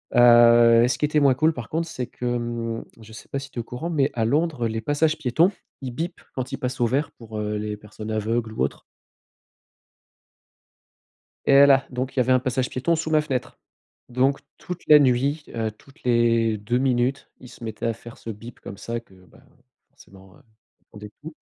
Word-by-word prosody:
heu, 120 Hz, -1 st, +7 dB
ce 125 Hz, -, -1 dB
qui 150 Hz, -, +1 dB
était 150 Hz, 0 st, +1 dB
moins 140 Hz, -2 st, +5 dB
cool 155 Hz, +3 st, +2 dB
par 120 Hz, -5 st, -7 dB
contre, 165 Hz, +1 st, -2 dB
c'est 125 Hz, -6 st, -5 dB
que, 125 Hz, -, -8 dB
hem 120 Hz, -1 st, -2 dB, 0.2 s
je 110 Hz, 0 st, -14 dB
sais -, -, -12 dB
pas 140 Hz, -, -2 dB
si 135 Hz, 0 st, -10 dB
tu 120 Hz, -, -6 dB
es -, -, 0 dB
au -, -, -8 dB
courant, 135 Hz, +9 st, -6 dB
mais 145 Hz, -4 st, +1 dB
à 115 Hz, -2 st, -1 dB
Londres, 145 Hz, -2 st, 0 dB
les 110 Hz, 0 st, -3 dB
passages 155 Hz, +5 st, +1 dB
piétons, 155 Hz, +7 st, +2 dB, 0.3 s
ils 130 Hz, -2 st, -5 dB
bipent 170 Hz, +7 st, -5 dB
quand 130 Hz, -1 st, -4 dB
ils -, -, -3 dB
passent 130 Hz, 0 st, -4 dB
au -, -, +4 dB
vert 140 Hz, +5 st, 0 dB
pour, 110 Hz, -2 st, -10 dB
heu, 105 Hz, 0 st, -2 dB
les 105 Hz, 0 st, -3 dB
personnes 105 Hz, +1 st, -9 dB
aveugles 110 Hz, +1 st, -1 dB
ou -, -, -4 dB
autres. -, -, -3 dB, 2.6 s
Et -, -, +4 dB
voilà, 140 Hz, -1 st, +6 dB
donc 130 Hz, +1 st, -4 dB
il -, -, -2 dB
y -, -, +5 dB
avait 130 Hz, +1 st, +3 dB
un 130 Hz, -, +5 dB
passage 130 Hz, 0 st, -1 dB
piéton 165 Hz, +6 st, 0 dB
sous 160 Hz, 0 st, -3 dB
ma 155 Hz, -1 st, +3 dB
fenêtre. 130 Hz, -5 st, -4 dB, 0.5 s
Donc 130 Hz, +4 st, +1 dB, 0.2 s
toute 180 Hz, 0 st, -7 dB
la 150 Hz, -1 st, +9 dB
nuit, 140 Hz, +3 st, +1 dB
heu, 110 Hz, -1 st, -1 dB
toutes 135 Hz, +6 st, -21 dB
les 115 Hz, -2 st, +2 dB
2 120 Hz, +4 st, -1 dB
minutes, 130 Hz, +1 st, 0 dB
il 125 Hz, -, -12 dB
se 120 Hz, -1 st, -12 dB
mettait 110 Hz, +1 st, -4 dB
à 115 Hz, -, +1 dB
faire 120 Hz, +1 st, -13 dB
ce 115 Hz, -, -7 dB
bip 115 Hz, +3 st, -10 dB
comme 100 Hz, -, -9 dB
ça 115 Hz, +3 st, -5 dB
que 95 Hz, -5 st, -23 dB
bah, -, -, -20 dB, 0.5 s
forcément, 95 Hz, -1 st, -18 dB
heu, 145 Hz, -, -21 dB, 0.5 s
rendait 105 Hz, 0 st, -10 dB
fous. 160 Hz, 0 st, -9 dB
125 Hz, 210 wpm, -24 LUFS, 115-140 Hz, 2.6 s, la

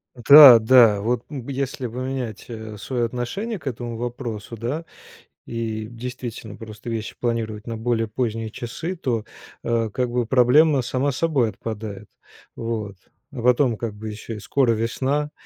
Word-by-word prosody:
Да, 130 Hz, 0 st, +10 dB
да, 115 Hz, -2 st, +6 dB
вот, 120 Hz, +3 st, -1 dB
м, 135 Hz, -5 st, -7 dB
если 135 Hz, -1 st, -3 dB
поменять, 125 Hz, -2 st, -5 dB
э, 110 Hz, -2 st, -7 dB
свое 120 Hz, +4 st, -2 dB
отношение 180 Hz, -, -4 dB
к 150 Hz, -, -20 dB
этому 120 Hz, -2 st, -4 dB
вопросу, 120 Hz, -2 st, -5 dB
да, 140 Hz, +9 st, -3 dB, 0.6 s
и 110 Hz, -2 st, -4 dB
действительно 120 Hz, -2 st, -7 dB
просто 110 Hz, +1 st, -9 dB
вещи 110 Hz, -2 st, -4 dB
планировать 115 Hz, -3 st, -2 dB
на 115 Hz, -, -3 dB
более 115 Hz, 0 st, -1 dB
поздние 115 Hz, 0 st, -2 dB
часы, 145 Hz, -, -5 dB
то, 120 Hz, -9 st, -2 dB, 0.4 s
э, 115 Hz, -1 st, 0 dB
как 125 Hz, +4 st, -2 dB
бы 120 Hz, 0 st, 0 dB
проблема 130 Hz, +5 st, +4 dB
сама 130 Hz, +3 st, 0 dB
собой 140 Hz, -5 st, +1 dB
отпадает, 105 Hz, -2 st, -7 dB, 0.5 s
вот. 110 Hz, -3 st, -4 dB, 0.4 s
А 125 Hz, -, -5 dB
потом, 125 Hz, 0 st, +3 dB
как 110 Hz, -1 st, -4 dB
бы, 110 Hz, +1 st, -7 dB
ещё 110 Hz, +2 st, -7 dB
и -, -, -7 dB
скоро 125 Hz, +5 st, +1 dB
весна, 135 Hz, +6 st, -1 dB
120 Hz, 150 wpm, -23 LUFS, 110-130 Hz, 0.6 s, Да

